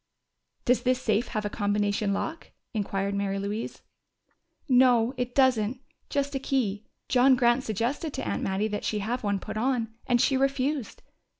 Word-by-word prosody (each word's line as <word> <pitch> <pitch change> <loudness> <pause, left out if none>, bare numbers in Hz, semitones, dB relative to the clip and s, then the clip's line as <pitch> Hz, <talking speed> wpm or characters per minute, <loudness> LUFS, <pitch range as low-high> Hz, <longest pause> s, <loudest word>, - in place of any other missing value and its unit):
"Does 245 -1 +3
this 255 0 +1
safe 220 -1 +1
have 215 -2 -3
a - - 0
combination 205 -1 0
lock?" 320 +11 -3 0.2
inquired 200 -2 -1
Mary 200 -1 -1
Louise. 205 +3 -4 0.8
"No, 250 -2 +4
it 250 -1 -3
doesn't. 255 -3 +3 0.3
Just 280 0 -1
a 270 - -1
key. 220 -7 -1 0.2
John 260 +1 +5
Grant 245 +1 +3
suggested 240 - -2
to 115 - -4
Aunt 100 -1 -1
Mattie 195 +3 0
that 210 -1 -4
she 215 - -1
have 230 +5 -2
one 200 -1 +1
put 195 - -6
on, 230 -1 0
and 245 -1 +3
she 265 +2 +3
refused. 275 -1 -1
235 Hz, 165 wpm, -27 LUFS, 205-260 Hz, 0.8 s, John